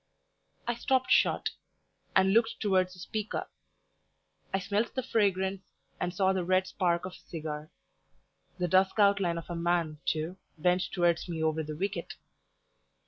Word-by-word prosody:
I 240 Hz, -, +2 dB
stopped 260 Hz, +2 st, +1 dB
short, -, -, +3 dB, 0.6 s
and 190 Hz, 0 st, +5 dB
looked 230 Hz, +1 st, +3 dB
towards 185 Hz, -3 st, +2 dB
the 180 Hz, -, -14 dB
speaker. 215 Hz, +4 st, -3 dB, 1.0 s
I -, -, +2 dB
smelt 200 Hz, +4 st, -1 dB
the 260 Hz, -, -1 dB
fragrance, 195 Hz, -5 st, +1 dB, 0.4 s
and 180 Hz, -, -1 dB
saw 190 Hz, +1 st, +2 dB
the 185 Hz, -1 st, 0 dB
red 185 Hz, +1 st, +2 dB
spark 180 Hz, -2 st, 0 dB
of 185 Hz, -, -5 dB
a -, -, -17 dB
cigar; 155 Hz, -2 st, -5 dB, 0.9 s
the 180 Hz, -1 st, 0 dB
dusk 190 Hz, +3 st, +3 dB
outline 200 Hz, -4 st, +3 dB
of 165 Hz, -, -6 dB
a -, -, -2 dB
man, 170 Hz, -2 st, 0 dB
too, 160 Hz, +4 st, -1 dB, 0.2 s
bent 180 Hz, +3 st, +2 dB
towards 175 Hz, -1 st, +1 dB
me 160 Hz, -2 st, -2 dB
over 160 Hz, 0 st, +1 dB
the 155 Hz, -1 st, -6 dB
wicket. 200 Hz, +3 st, -3 dB
185 Hz, 150 wpm, -30 LUFS, 170-200 Hz, 1.0 s, and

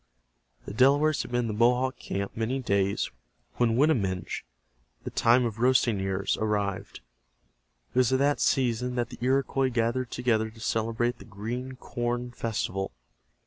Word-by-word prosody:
The -, -, -6 dB
Delawares 140 Hz, +6 st, +4 dB
had -, -, -7 dB
been 120 Hz, 0 st, +1 dB
in 120 Hz, -, -2 dB
the 110 Hz, -, -2 dB
Mohawk 125 Hz, +4 st, +2 dB
camp 100 Hz, +1 st, -4 dB
many 115 Hz, +4 st, -1 dB
days 100 Hz, -6 st, 0 dB, 0.5 s
when 115 Hz, -1 st, +2 dB
Winaminge, 110 Hz, -, +1 dB, 0.6 s
The -, -, -5 dB
Time 120 Hz, +2 st, +4 dB
Of 115 Hz, -1 st, -4 dB
Roasting 125 Hz, -4 st, +3 dB
Ears, 95 Hz, 0 st, -1 dB
arrived. 105 Hz, -, -2 dB, 0.9 s
It 125 Hz, -, +2 dB
was 125 Hz, -2 st, +3 dB
at 130 Hz, -, +4 dB
that 140 Hz, +2 st, +2 dB
season 125 Hz, -1 st, +1 dB
that 120 Hz, -1 st, -1 dB
the -, -, -10 dB
Iroquois 135 Hz, +1 st, +1 dB
gathered 120 Hz, +1 st, 0 dB
together 110 Hz, -3 st, 0 dB
to 110 Hz, +1 st, -16 dB
celebrate 115 Hz, +2 st, -1 dB
the -, -, -12 dB
Green 120 Hz, +5 st, -5 dB
Corn 120 Hz, -1 st, -3 dB
Festival. 105 Hz, -5 st, -3 dB
120 Hz, 150 wpm, -27 LUFS, 110-130 Hz, 0.9 s, Delawares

